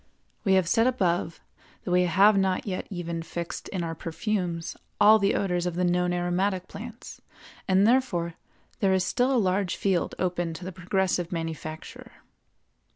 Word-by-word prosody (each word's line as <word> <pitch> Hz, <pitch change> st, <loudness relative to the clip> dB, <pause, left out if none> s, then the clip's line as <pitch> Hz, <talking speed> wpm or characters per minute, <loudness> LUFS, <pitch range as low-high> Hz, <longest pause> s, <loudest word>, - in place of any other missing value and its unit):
We 195 Hz, -2 st, +3 dB
have 185 Hz, -3 st, +3 dB
said 225 Hz, +7 st, +3 dB
above 180 Hz, -9 st, 0 dB, 0.4 s
that -, -, -4 dB
we 180 Hz, 0 st, +4 dB
have 195 Hz, +5 st, +5 dB
not 190 Hz, -1 st, +1 dB
yet 190 Hz, -3 st, -4 dB
even 170 Hz, -3 st, -4 dB
fixed 170 Hz, +1 st, -6 dB
in 185 Hz, -3 st, -3 dB
our 165 Hz, -1 st, -3 dB
perfumes 170 Hz, 0 st, -3 dB, 0.2 s
all 215 Hz, +1 st, +7 dB
the 200 Hz, 0 st, +2 dB
odors 180 Hz, -2 st, 0 dB
of 175 Hz, -, -3 dB
the 180 Hz, -, 0 dB
known 180 Hz, 0 st, +1 dB
aromatic 180 Hz, +2 st, -1 dB
plants, 225 Hz, +3 st, -10 dB, 0.5 s
and 190 Hz, +1 st, +4 dB
therefore 215 Hz, -9 st, +2 dB, 0.5 s
there 195 Hz, -4 st, +3 dB
is 190 Hz, -1 st, +2 dB
still 250 Hz, +7 st, +1 dB
a 265 Hz, -, +3 dB
large 190 Hz, -3 st, +1 dB
field 190 Hz, -4 st, 0 dB
open 175 Hz, -2 st, -1 dB
to 175 Hz, -, -8 dB
the 185 Hz, -, -5 dB
progressive 185 Hz, -1 st, -1 dB
manufacturer. 160 Hz, -2 st, -6 dB
180 Hz, 160 wpm, -26 LUFS, 175-200 Hz, 0.5 s, all